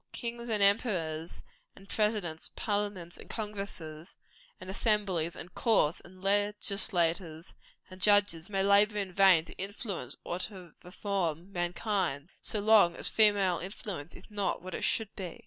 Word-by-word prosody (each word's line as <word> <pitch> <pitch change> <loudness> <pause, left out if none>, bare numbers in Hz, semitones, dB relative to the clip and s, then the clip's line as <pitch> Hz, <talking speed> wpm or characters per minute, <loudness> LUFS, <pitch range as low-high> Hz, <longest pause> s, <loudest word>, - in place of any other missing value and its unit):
Kings, 235 0 -5
and 210 -2 +2
emperors, 180 -7 0 0.3
and 195 - -16
presidents, 210 -7 -1
parliaments, 205 -5 -2
and - - -14
congresses, 195 -7 -6 0.4
and 185 - -10
assemblies, 190 -4 0
and 180 +2 -10
courts, 205 -9 +2
and 185 +1 -16
legislators, 195 -5 +1 0.3
and 185 0 -13
judges, 205 -5 +4
may 195 -1 0
labor 205 +1 +5
in 195 -3 -3
vain 185 -4 +6
to - - -12
influence 200 0 -5
or 175 - -3
to 185 -5 -7
reform 180 -2 -3
mankind, 175 -3 -1
so 215 - -1
long 205 -5 +5
as - - +2
female 200 -5 +3
influence 185 -4 -6
is 180 - -13
not 205 -3 -2
what 185 - -7
it - - -4
should 220 -2 -1
be. 185 -4 -7
195 Hz, 145 wpm, -30 LUFS, 175-205 Hz, 0.4 s, vain